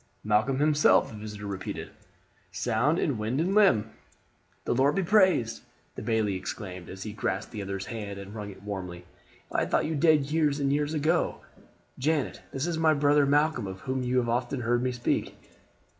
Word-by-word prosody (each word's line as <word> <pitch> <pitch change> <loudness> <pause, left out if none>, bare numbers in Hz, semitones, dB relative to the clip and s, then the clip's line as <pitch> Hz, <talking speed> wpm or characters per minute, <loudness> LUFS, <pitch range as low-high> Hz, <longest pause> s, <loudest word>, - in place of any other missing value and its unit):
"Malcolm 110 +5 +2
himself," 150 +1 +4
the - - -9
visitor 105 -1 -7
repeated, 100 -2 -5 0.6
"sound 120 - +1
in 140 -11 0
wind 110 +6 -1
and 180 +4 +1
limb." 125 - +4 0.7
"The - - +1
Lord 135 +4 +3
be 195 - +1
praised!" 185 - +3 0.3
the - - -7
bailie 110 -3 0
exclaimed 95 -1 -6
as 95 0 -7
he 105 - -6
grasped 100 -1 -3
the 105 - -5
other's 95 0 -4
hand 105 -4 -6
and 100 +1 -9
wrung 105 -2 -6
it 95 0 -12
warmly. 90 -4 -6 0.5
"I - - +1
had - - -1
thought - - +2
you 160 - -2
dead 150 -2 +3
years 150 -2 +2
and 140 -1 +1
years 150 +2 0
ago. 155 +3 +1 0.6
Janet, 150 +1 0
this 135 +2 -2
is 170 -2 -2
my 160 -1 +4
brother 145 0 +4
Malcolm 145 -5 +2
of 95 0 -7
whom 130 0 -2
you 125 0 0
have 120 -2 +2
often 125 +2 -1
heard 120 +1 +1
me 130 0 0
speak." 120 -1 -1
125 Hz, 190 wpm, -28 LUFS, 105-150 Hz, 0.7 s, himself